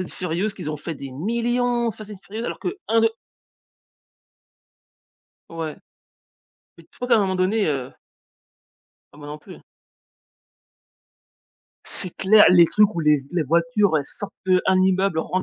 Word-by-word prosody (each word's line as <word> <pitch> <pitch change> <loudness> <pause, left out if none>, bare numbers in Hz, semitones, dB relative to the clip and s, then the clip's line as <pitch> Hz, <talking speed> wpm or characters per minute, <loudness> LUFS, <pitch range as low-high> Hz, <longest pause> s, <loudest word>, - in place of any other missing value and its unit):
and 185 - -5
Furious 180 +4 -3
qu'ils 180 -7 -6
ont 150 - -4
fait 160 +3 -6
des 140 -1 -9
millions 235 - -1
de - - -12
Fast 215 -1 -11
and - - -9
Furious, 220 +3 -7
alors - - -4
que 365 +3 -4
1-2. 225 0 +3 2.4
Ouais, 165 -2 -5 1.0
mais - - -16
tu - - -35
crois 250 - -5
qu'à 235 - +5
un - - +3
moment 190 -2 0
donné, 195 +3 +1
heu. 135 -4 -3 1.2
Ah 145 - -16
moi 145 - -10
non 150 - -7
plus - - -13
hein. - - -19 2.2
C'est 185 - -3
clair, 210 +2 +6
les 175 -1 +7
trucs 210 +4 +3
où 170 - -2
les 150 -2 +3
v 135 - -13
les 175 -3 +1
voitures, 165 +3 +2
elles 140 - -5
sortent 205 - -5
d'un 185 0 +3
immeuble, 190 -2 +1
rentrent 185 +3 -2
185 Hz, 165 wpm, -22 LUFS, 160-215 Hz, 2.4 s, les